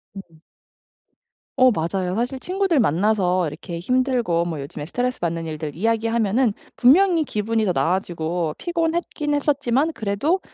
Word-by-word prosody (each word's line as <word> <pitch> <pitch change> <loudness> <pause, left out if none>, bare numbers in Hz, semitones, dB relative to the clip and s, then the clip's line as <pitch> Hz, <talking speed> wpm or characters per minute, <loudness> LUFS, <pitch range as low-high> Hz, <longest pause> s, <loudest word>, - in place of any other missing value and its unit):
음. 165 -5 -12 1.2
어 255 -1 +7
맞아요. 180 +1 -2
사실 245 +5 -2
친구들 370 -1 0
만나서 185 - +2
이렇게 170 +3 -7
힘들고 245 -5 +1
뭐 160 -4 -4
요즘에 145 +1 -7
스트레스받는 170 -6 -2
일들 155 -2 -5
이야기하면은 225 +2 +1 0.2
분명히 335 +6 +5
기분이 220 -3 -1
더 185 - +2
나아지고 170 -2 -1
피곤했긴 330 -3 -1
했었지만 285 0 +1
그래도 220 - 0
215 Hz, 335 characters per minute, -22 LUFS, 170-265 Hz, 1.2 s, 어